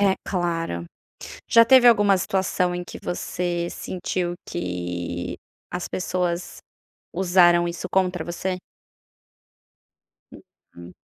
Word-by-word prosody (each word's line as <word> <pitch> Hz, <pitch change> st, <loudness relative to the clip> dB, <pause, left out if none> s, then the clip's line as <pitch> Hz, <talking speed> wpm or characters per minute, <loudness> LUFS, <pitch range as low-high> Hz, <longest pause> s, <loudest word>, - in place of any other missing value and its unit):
É 195 Hz, -1 st, +4 dB
claro. 165 Hz, -, -2 dB, 0.6 s
Já 230 Hz, 0 st, +7 dB
teve 255 Hz, 0 st, +7 dB
alguma 205 Hz, -4 st, +6 dB
situação 180 Hz, -1 st, 0 dB
em 180 Hz, -, -3 dB
que -, -, -9 dB
você 175 Hz, -1 st, -2 dB
sentiu 180 Hz, -1 st, -3 dB
que 90 Hz, 0 st, -4 dB, 0.3 s
as 180 Hz, 0 st, -4 dB
pessoas 180 Hz, -1 st, -2 dB, 0.6 s
usaram 175 Hz, -2 st, +4 dB
isso 170 Hz, -, -5 dB
contra 185 Hz, -1 st, +1 dB
você? 180 Hz, +2 st, -3 dB, 1.7 s
Uhum. 85 Hz, +1 st, -15 dB
175 Hz, 100 wpm, -24 LUFS, 170-190 Hz, 1.7 s, Já